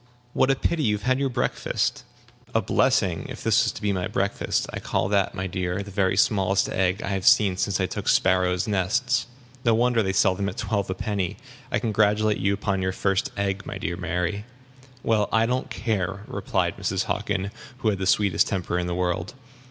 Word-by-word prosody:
What 130 - +3
a 135 - +4
pity 165 +4 0
you 105 -7 +2
have 105 - -7
had 130 +1 +2
your 140 -1 +1
breakfast!" 125 - -1 0.5
"A - - +4
blessing - - +1
if - - -8
this - - +4
was - - 0
to - - -9
be 100 -1 +1
my 90 -1 -1
breakfast. 100 +1 -1
I - - -3
call - - -1
that, 100 -1 +1
my 95 -1 -3
dear, 90 +1 -2
the 100 - -10
very 95 -1 +1
smallest 95 -2 +2
egg 95 +2 0
I - - -3
have 95 -2 -1
seen 100 -3 +5
since 100 0 -1
I 95 - +2
took - - -5
sparrows' 90 0 +2
nests. 120 +7 +1 0.4
No 115 -2 +4
wonder 120 0 +3
they 95 -2 0
sell 95 0 +3
them 100 +1 -2
at - - -9
twelve 100 -2 -1
a 95 - -1
penny. 100 -4 -2 0.3
I - - +2
congratulate 110 -1 +2
you 100 - +1
upon 100 -1 -1
your 95 0 0
first 95 0 0
egg, 100 0 -1
my - - -5
dear - - -3
Mary." 90 +4 -2 0.6
"Well, 110 -2 +2
I 110 0 +3
don't 125 +2 -1
care," 100 -1 -2
replied - - -1
Mrs. - - -1
Hockin, 100 0 -2 0.3
who 115 -4 +1
had 100 -3 -1
the 95 - -1
sweetest 100 -2 +3
temper 90 -2 -1
in 90 - -2
the 90 - -2
world. 90 +2 -2
100 Hz, 205 wpm, -25 LUFS, 95-110 Hz, 0.6 s, seen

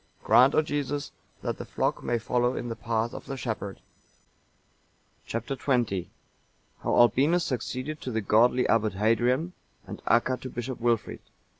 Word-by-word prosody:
Grant, 130 +3 +6
O 155 - +4
Jesus, 145 -1 -3 0.3
that - - -3
the - - -4
flock - - -1
may 120 - 0
follow 120 +2 0
in 120 - -4
the 115 - -3
path 115 +1 -2
of - - -9
the 135 - -4
shepherd." 110 -6 -4 1.5
Chap. 115 0 -3
XX. 120 -8 0 0.7
How - - 0
Albinus 140 +9 +4
succeeded 130 +4 -4
to - - -5
the 110 -2 -1
godly 120 +4 +3
Abbot 110 -2 +2
Hadrian, 120 - +1 0.3
and 100 +1 -8
Acca 125 +2 +3
to 130 - -6
Bishop 120 +1 -5
Wilfrid. 120 -2 0
120 Hz, 150 wpm, -27 LUFS, 115-130 Hz, 1.5 s, Grant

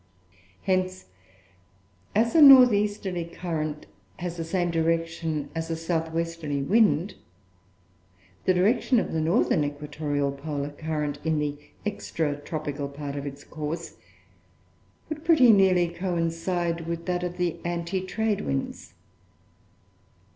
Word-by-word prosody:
Hence, 185 -1 0 1.1
as 230 +2 +3
a 325 - +6
north 260 -4 +10
easterly 205 -4 -1
current 160 -3 -4 0.3
has 175 -1 -4
the 165 - -4
same 175 +1 -1
direction 165 -2 -1
as 165 0 -4
a 165 - -1
south 165 0 -2
westerly 165 -4 -2
wind, 200 0 +3 1.3
the 185 - +4
direction 225 +6 +3
of - - -3
the 160 - 0
northern 155 -3 +2
equatorial 145 -1 -2
polar 145 0 -4
current 150 -1 -3
in 160 -1 +1
the 150 -1 -1 0.3
extra 160 -7 -2
tropical 145 -1 -4
part 140 0 -6
of 140 0 -4
its 140 +1 -8
course 155 +2 -6 1.1
would 310 0 -6
pretty 310 -8 +6
nearly 190 -4 +4
coincide 170 -1 -2
with 170 0 -4
that 180 -1 -1
of 180 0 -4
the 175 -2 -1
anti 175 +2 -2
trade 210 +2 -1
winds. 135 -7 -4
165 Hz, 125 wpm, -26 LUFS, 150-185 Hz, 1.3 s, north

